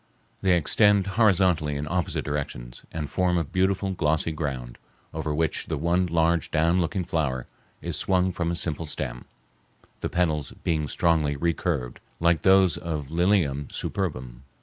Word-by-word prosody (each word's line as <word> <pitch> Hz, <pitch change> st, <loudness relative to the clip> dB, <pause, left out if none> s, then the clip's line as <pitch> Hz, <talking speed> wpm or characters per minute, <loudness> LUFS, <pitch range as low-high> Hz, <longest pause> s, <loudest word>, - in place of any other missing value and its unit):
They 95 Hz, -2 st, +4 dB
extend 100 Hz, +4 st, +3 dB
horizontally 95 Hz, -7 st, +2 dB
in 70 Hz, +1 st, -3 dB
opposite 90 Hz, +1 st, -1 dB
directions, 70 Hz, -5 st, -5 dB
and 75 Hz, -2 st, -4 dB
form 90 Hz, +2 st, +1 dB
a 85 Hz, -, +1 dB
beautiful 95 Hz, +4 st, 0 dB
glossy 80 Hz, -2 st, 0 dB
ground, 65 Hz, -6 st, -4 dB, 0.3 s
over 80 Hz, -1 st, -3 dB
which 80 Hz, +1 st, -1 dB
the -, -, -2 dB
one 85 Hz, +4 st, +1 dB
large 85 Hz, 0 st, +1 dB
down 85 Hz, +3 st, +2 dB
looking 90 Hz, +1 st, -2 dB
flower 70 Hz, -7 st, -1 dB, 0.4 s
is -, -, -2 dB
swung 95 Hz, -1 st, +1 dB
from 85 Hz, -1 st, -2 dB
a 85 Hz, -, -1 dB
simple 80 Hz, -1 st, -1 dB
stem, 65 Hz, -5 st, -4 dB, 0.7 s
the -, -, -3 dB
petals 80 Hz, -5 st, 0 dB
being 80 Hz, -3 st, 0 dB
strongly 75 Hz, -1 st, +1 dB
recurved, 80 Hz, -4 st, -1 dB, 0.2 s
like 85 Hz, -2 st, +3 dB
those 95 Hz, -3 st, +5 dB
of 75 Hz, -4 st, -4 dB
Lilium 85 Hz, -6 st, +1 dB
superbum. 65 Hz, -10 st, -4 dB
80 Hz, 150 wpm, -26 LUFS, 75-90 Hz, 0.7 s, those